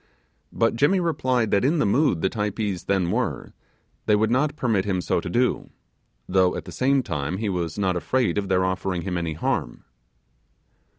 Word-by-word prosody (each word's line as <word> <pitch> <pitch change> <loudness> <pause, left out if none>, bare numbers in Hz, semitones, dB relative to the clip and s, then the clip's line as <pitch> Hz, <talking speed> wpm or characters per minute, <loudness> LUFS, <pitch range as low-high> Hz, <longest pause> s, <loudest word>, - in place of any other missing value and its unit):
But 115 0 +1
Jimmy 145 +11 +3
replied, 130 -9 0
that 100 - +3
in 150 +6 +2
the 150 - +2
mood 105 - +2
the 95 - +3
Typees 105 -3 -2
then 95 -3 +1
were 125 +4 -2 0.5
they 105 - +5
would 110 +2 +1
not 145 +4 +1
permit 115 -9 +1
him 95 -2 -1
so 90 - 0
to 85 - -5
do, 120 +7 0 0.6
though 90 -1 +2
at - - -6
the - - -9
same 135 +1 +1
time 80 -2 -3
he 105 0 -2
was 85 -3 -3
not 95 -3 0
afraid 120 +5 0
of 100 -1 -4
their 95 -1 +2
offering 95 -1 -2
him 95 -2 -3
any 85 -2 -2
harm. 75 -5 -2
100 Hz, 185 wpm, -24 LUFS, 90-125 Hz, 0.6 s, they